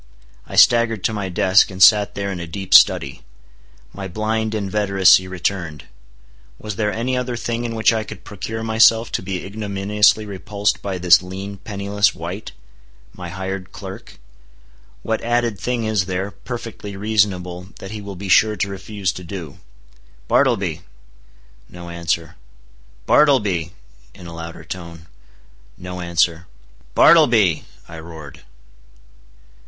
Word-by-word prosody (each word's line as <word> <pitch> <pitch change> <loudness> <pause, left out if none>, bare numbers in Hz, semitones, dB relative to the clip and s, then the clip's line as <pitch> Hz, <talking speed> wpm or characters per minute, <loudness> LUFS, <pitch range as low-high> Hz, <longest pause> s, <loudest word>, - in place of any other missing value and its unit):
I - - -8
staggered 115 -4 +4
to 110 - 0
my 100 -3 -3
desk, 95 +2 +4
and 95 - -9
sat 105 +2 +6
there 100 0 -3
in 90 - -5
a 85 - -6
deep 95 +3 -5
study. 70 -1 +5 0.7
My 100 -1 -6
blind 110 +3 -2
inveteracy 100 -2 +3
returned. 90 -4 -3 0.7
Was 105 -2 -6
there 105 0 0
any 125 +4 -2
other 125 -1 -2
thing 120 0 -3
in 115 -1 -4
which 110 +1 +3
I 110 -1 -1
could - - -11
procure 110 +3 -6
myself 115 +1 +4
to - - -2
be 95 -1 -5
ignominiously 105 +1 +1
repulsed 100 +1 -2
by 95 -2 -4
this 90 -1 +5
lean, 95 +2 -7
penniless 100 0 0
wight?—my 60 - -10
hired 95 +1 -5
clerk? 95 - -10 0.9
What 110 -1 -2
added 120 -3 0
thing 125 -2 -2
is 110 -4 0
there, 95 +2 -3
perfectly 105 -1 -8
reasonable, 95 -4 -1
that 95 - -9
he 110 -1 -6
will 100 -1 -8
be 95 +2 -7
sure 105 +3 +4
to 100 - -2
refuse 100 0 -3
to 90 - -9
do? 85 -5 -8 0.7
"Bartleby!" 100 - +1 0.9
No 85 -1 -10
answer. 85 -1 -3 0.7
"Bartleby," 105 - +3 0.4
in 90 - -12
a 85 - -9
louder 85 0 -8
tone. 85 0 -9 0.7
No 90 0 -7
answer. 85 0 0 0.5
"Bartleby," 115 - +5 0.2
I 80 -1 -9
roared. 80 -3 -11
100 Hz, 135 wpm, -20 LUFS, 90-110 Hz, 0.9 s, sat